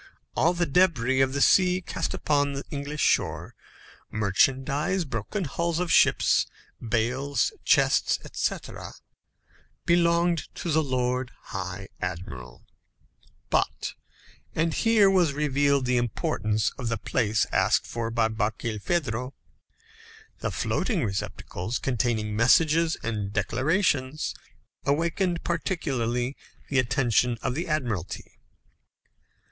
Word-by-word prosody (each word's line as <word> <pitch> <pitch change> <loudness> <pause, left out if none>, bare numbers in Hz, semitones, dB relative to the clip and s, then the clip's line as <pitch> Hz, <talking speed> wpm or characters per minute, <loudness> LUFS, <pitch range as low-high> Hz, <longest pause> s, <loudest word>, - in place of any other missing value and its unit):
All 170 +3 +3
the 175 0 +1
débris 135 -6 +3
of 130 0 -1
the 140 - -1
sea 180 -1 +4
cast 185 - -3
upon 145 -2 +1
the 140 +1 -4
English 145 +1 -4
shore - - +1 0.6
merchandise, 135 - +1
broken 130 - -3
hulls 170 +2 -1
of 175 -1 -1
ships, - - +4 0.3
bales, 125 - 0
chests, - - +3
etc. - - -4 0.9
belonged 170 -1 +2
to 170 - -3
the 160 +1 +3
Lord 125 -2 -1 0.2
High 95 0 -5
Admiral; 85 -9 -6 0.9
but - - 0 0.6
and 165 0 +1
here 225 -3 +4
was 180 -6 +3
revealed 140 -2 +1
the 125 0 +2
importance 110 -2 0
of 125 - -3
the 115 - -1
place 110 0 +1
asked - - +2
for 115 -1 -3
by 115 -1 +2
Barkilphedro 115 +4 -2 1.0
the - - -2
floating 200 -10 -1
receptacles 100 +1 -4
containing 115 -4 -1
messages 160 +8 +4
and 105 -3 -3
declarations 130 - 0 0.5
awakened 170 +4 0
particularly 135 -8 -1 0.3
the 135 - +2
attention 120 -1 +2
of - - 0
the 165 +7 -3
Admiralty. 120 - -3
135 Hz, 110 wpm, -26 LUFS, 115-165 Hz, 1.0 s, sea